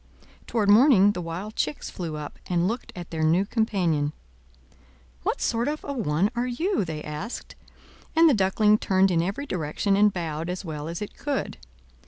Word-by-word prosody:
Toward 220 -4 0
morning 205 -2 +6
the 180 - -4
wild 180 +6 -6
chicks 150 -1 -2
flew 165 -4 -5
up, 150 -1 -7
and 175 0 +1
looked 230 +5 -4
at 175 -1 -8
their 160 -1 -3
new 165 +5 +3
companion. 180 -10 0 1.1
"What - - -1
sort 235 +2 0
of 305 +1 -3
a 285 - -4
one 200 - +1
are 240 +1 0
you?" 335 - 0
they 155 -3 -5
asked; 150 +10 -6 0.6
and 330 +1 +7
the 300 - +5
Duckling 210 +1 +3
turned 190 0 +3
in 165 -2 +2
every 200 +11 -3
direction, 180 - -1
and 205 +1 +5
bowed 165 -2 -4
as 180 +2 -4
well 150 -2 -5
as 170 +5 -4
it 210 - -9
could. 285 -2 -3
190 Hz, 180 wpm, -25 LUFS, 165-225 Hz, 1.1 s, and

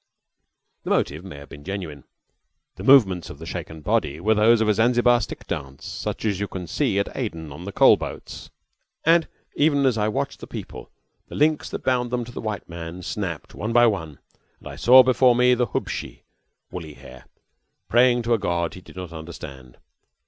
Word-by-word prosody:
The - - -7
motive 75 +4 0
may 95 -7 -9
have 70 0 -12
been 75 - -11
genuine. 90 -7 -6 0.7
The - - -9
movements 95 - +5
of - - -9
the 80 - -10
shaken 80 -2 -6
body 80 -7 0
were 110 +6 +2
those 110 +2 +4
of 110 - +1
a 105 - +4
Zanzibar 120 +2 +3
stick - - -7
dance, 70 0 -6
such - - -5
as 100 -4 0
you 100 - -2 0.2
see 90 +4 0
at 100 - -1
Aden 80 - -4
on 85 +6 -9
the 100 - -5
coal - - +6
boats, - - -8 0.6
and 165 +1 +4 0.3
even 145 -2 +2
as 125 -4 +2
I 105 - +1
watched 110 - -3
the - - -9
people, - - -8 0.4
the - - -10
links 150 +1 +1
that - - -6
bound 125 -1 +1
them 120 -1 -2
to 120 - -10
the - - -7
white 105 -4 -4
man 85 +1 -8
snapped 90 -3 -5
one 110 +2 -4
by 120 0 +6
one, 85 -10 -1 0.4
and - - -13
I - - -8
saw 130 +2 +7
before 125 -1 +4
me 125 +1 +4
the 125 -1 +1
hubshi - - -5 0.5
(woolly 80 -5 -7
hair) 65 0 -14 0.6
praying 120 0 +4
to 120 +1 +1
a 115 - +2
God 85 -3 -1
he 90 - -10
did - - -16
not 90 -2 -7
understand. 70 -6 -10
100 Hz, 195 wpm, -23 LUFS, 80-120 Hz, 0.7 s, saw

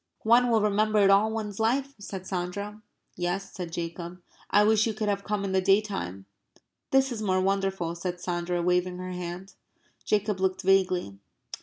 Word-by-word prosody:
"One 240 +2 +5
will 225 -2 +3
remember 215 +1 +2
it 200 -1 +6
all 205 +3 +4
one's 215 -2 -4
life," 265 +5 +1
said 190 -2 -7
Sandra. 200 +3 -4 0.3
"Yes," 180 +3 -3
said 175 -3 -6
Jacob. 170 +1 -5 0.3
"I 205 - +5
wish 220 +1 +4
you 220 - -2
could 215 0 -2
have 200 -1 -1
come 205 -1 -2
in 195 - -2
the 190 0 +2
day 195 +2 +5
time." 100 - -5 0.6
"This 270 0 +3
is 225 -3 -4
more 185 -3 +1
wonderful," 195 -3 0
said 175 +1 -4
Sandra, 175 0 -2
waving 180 0 +1
her 185 0 -5
hand. 180 +1 -6 0.5
Jacob 210 -1 0
looked 190 0 0
vaguely. 185 - +2
195 Hz, 175 wpm, -27 LUFS, 180-210 Hz, 0.6 s, it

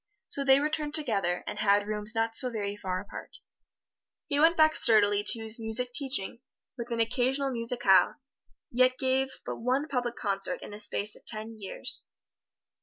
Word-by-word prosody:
So 280 - -2
they 270 0 +5
returned 300 0 -1
together, 200 - 0
and - - -5
had 205 0 +3
rooms 210 +2 -4
not 225 0 0
so 255 +1 +1
very 205 -3 -4
far 185 -3 -3
apart. - - -9 0.9
He 285 -3 -1
went 330 +3 +4
back 310 0 +5
sturdily 205 -3 +4
to 225 - +3
his 220 +1 +3
music 230 +3 -1
teaching, 260 -6 -1 0.4
with 240 -1 -7
an 235 -1 -3
occasional 260 +4 0
musicale, 230 -6 +2 0.6
yet 255 +1 +3
gave 265 0 +1 0.2
but - - -5
one 260 +5 -1
public 245 -4 -2
concert 195 -2 -1
in - - -9
the 205 - -8
space 210 0 0
of - - -16
ten 220 0 -1
years. 195 - -3
230 Hz, 170 wpm, -28 LUFS, 210-265 Hz, 0.9 s, they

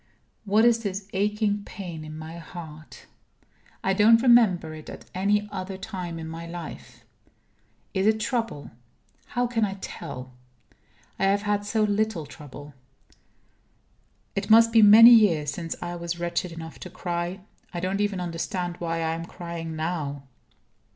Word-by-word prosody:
What 215 +3 +4
is 235 -1 +4
this 200 -2 -4
aching 205 +1 0
pain 175 -6 -7
in 155 0 -8
my 160 +2 -8
heart? 160 -2 -11 0.8
I 195 - +2
don't 225 +4 +5
remember 210 -10 +4
it 155 -1 -10
at - - -10
any 205 +3 +1
other 190 -1 -5
time 185 -4 -6
in 160 -1 -6
my 165 +1 -7
life. 170 -1 -9 0.9
Is 190 +1 +1
it 220 0 +3
trouble? 225 - -2 0.6
How 245 0 0
can 235 -2 0
I 195 -2 -1
tell? 130 -9 -8 0.9
I 195 - +2
have 200 +1 +2
had 205 0 0
so 215 +1 +1
little 210 -5 0
trouble. 145 0 -11 1.6
It 195 +2 -2
must 230 +1 +7
be 225 -1 +6
many 220 +3 +10
years 170 - +5
since 165 +1 -5
I 175 0 -4
was 170 0 -4
wretched 170 +1 -2
enough 165 -1 -9
to - - -8
cry. 175 +2 -4 0.3
I 175 - -4
don't 190 +3 -1
even 205 -2 0
understand 175 +1 -3
why 165 -1 -2
I 160 0 0
am 165 +1 -5
crying 170 -2 -6
now. 155 -4 -3
185 Hz, 150 wpm, -26 LUFS, 165-210 Hz, 1.6 s, many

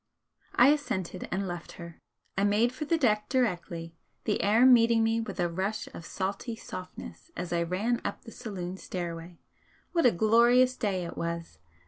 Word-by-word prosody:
I 245 +3 +7
assented, 190 - -1
and 195 +1 -1
left 175 -1 -6
her. 170 -1 -10 0.4
I 195 - +1
made 215 +4 +3
for 305 +4 -4
the 330 +2 +2
deck 215 -8 +1
directly, 175 -9 -1 0.3
the 210 - 0
air 220 +5 +5
meeting 230 -2 +6
me 225 +1 +1
with 220 -4 -6
a 175 - +2
rush 190 +5 -3
of 165 - -9
salty 200 +5 -3
softness 185 - -9
as 175 -1 -3
I 170 - +1
ran 200 +8 0
up - - -4
the 230 - -11
saloon 185 -5 -6
stairway. 170 -2 -6 0.5
What 335 -7 +4
a - - +5
glorious 235 +6 +4
day 195 -7 -1
it 170 - -8
was! 170 - -4
205 Hz, 170 wpm, -29 LUFS, 175-235 Hz, 0.5 s, I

